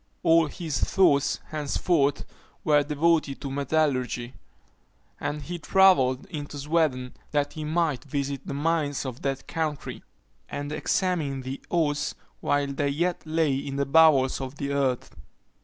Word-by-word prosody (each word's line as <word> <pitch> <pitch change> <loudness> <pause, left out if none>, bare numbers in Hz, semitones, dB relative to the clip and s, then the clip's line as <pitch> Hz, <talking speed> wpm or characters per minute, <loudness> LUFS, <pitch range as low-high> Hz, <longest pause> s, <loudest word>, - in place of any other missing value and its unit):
All 165 -2 +5
his 155 0 -3
thoughts 145 -7 +3
henceforth 150 0 0 0.4
were 150 -2 +4
devoted 150 0 +1
to 140 - -4
metallurgy; 135 -4 0 0.9
and 150 0 -3
he 175 +4 -5
travelled 150 -8 +4
into 145 -1 -7
Sweden 145 -4 0 0.2
that 145 -1 0
he 155 - -5
might 155 -3 0
visit 140 -1 -3
the - - -3
mines 145 -2 0
of 130 -2 -6
that 135 -1 -3
country, 155 -3 -3 0.5
and 145 0 -4
examine 155 -5 0
the 130 +2 -6
ores 150 -4 0 0.2
while 145 0 +1
they 140 +1 0
yet 170 +5 -1
lay 155 -2 +2
in 135 0 -4
the 140 0 0
bowels 140 -3 +5
of 130 +1 -5
the 140 -1 -3
earth. 135 -3 -1
145 Hz, 140 wpm, -26 LUFS, 140-160 Hz, 0.9 s, All